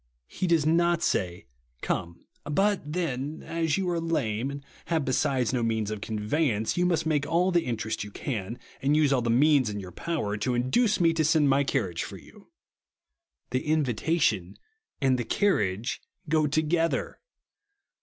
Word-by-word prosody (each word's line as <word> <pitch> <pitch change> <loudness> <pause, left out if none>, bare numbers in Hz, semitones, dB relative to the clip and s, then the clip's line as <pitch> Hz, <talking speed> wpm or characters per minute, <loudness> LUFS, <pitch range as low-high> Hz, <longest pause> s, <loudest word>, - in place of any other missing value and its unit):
He 185 - -3
does 165 -3 +3
not 170 +1 +2
say, 90 +1 -1 0.4
"Come; 85 0 -3 0.2
but 175 0 0
then, 150 -4 -3
as 165 -1 -1
you 190 -2 -1
are 170 - 0
lame, 135 -8 -1
and 140 0 -7 0.2
liave 160 -4 +1
besides 130 -2 +1
no 125 - +1
means 110 -2 -1
of 105 -2 -5
conve3^ance, 110 +2 -1
you 180 0 +2
must 165 -3 +1
make 150 -3 0
all 175 +4 +2
the 175 -2 +2
interest 110 -3 -2
you 105 - -8
can, 110 0 -4 0.2
and 145 +3 +2
use 150 -3 +3
all 130 - +2
the 120 - -1
means 135 0 +4
in 105 0 -4
your 95 -2 -8
power, 105 - -3
to 120 +4 -1
induce 200 - +2
me 165 -2 +4
to 160 -1 +1
send 155 -2 +3
my 135 +1 +3
caniage 105 - -1
for - - -6
you." - - -17 1.0
The 130 +1 0
invitation 130 - 0 0.4
and 130 -3 +2
the - - 0
carriage 110 - 0 0.3
go 155 -1 +2
togetlier. 160 +3 0
140 Hz, 165 wpm, -27 LUFS, 110-165 Hz, 1.0 s, means